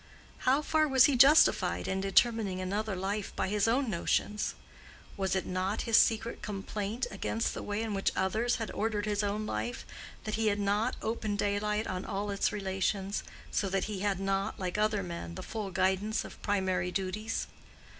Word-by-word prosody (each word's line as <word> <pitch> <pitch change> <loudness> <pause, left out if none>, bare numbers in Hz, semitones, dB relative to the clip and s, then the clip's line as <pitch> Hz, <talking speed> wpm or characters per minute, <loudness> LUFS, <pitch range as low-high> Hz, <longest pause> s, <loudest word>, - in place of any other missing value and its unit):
How 275 +4 +3
far 310 0 +2
was 265 -3 +6
he 290 -3 +3
justified 275 +5 +5
in 190 0 -1
determining 195 -1 +2
another 200 +2 -2
life 195 +2 -3
by - - -1
his 210 +1 +2
own 255 +4 +2
notions? 210 +2 0 0.6
Was 195 -1 0
it 190 - -1
not 185 +3 -1
his 230 - +2
secret 225 +1 +3
complaint 210 +3 -3
against 225 - -1
the - - -5
way 205 +2 -2
in 220 -2 -3
which 195 -1 +1
others 220 +6 +1
had 225 -2 -4
ordered 215 -1 -1
his 210 -1 0
own 210 +1 -1
life, 110 - -3 0.4
that 215 - -4
he 220 0 +1
had 205 -1 +1
not 205 +2 +1
open 220 -2 -1
daylight 210 +1 0
on 185 0 -3
all 200 +1 -3
its 200 - +1
relations, 195 0 -1 0.3
so 195 - 0
that 195 0 0
he 210 -3 -4
had 195 -1 0
not, 195 +2 -1
like 180 -2 -3
other 210 -1 +1
men, 170 - -6
the - - -6
full 215 -3 -4
guidance 190 +4 0
of - - -11
primary 190 -3 0
duties? 200 +4 -2
205 Hz, 180 wpm, -31 LUFS, 190-220 Hz, 0.6 s, was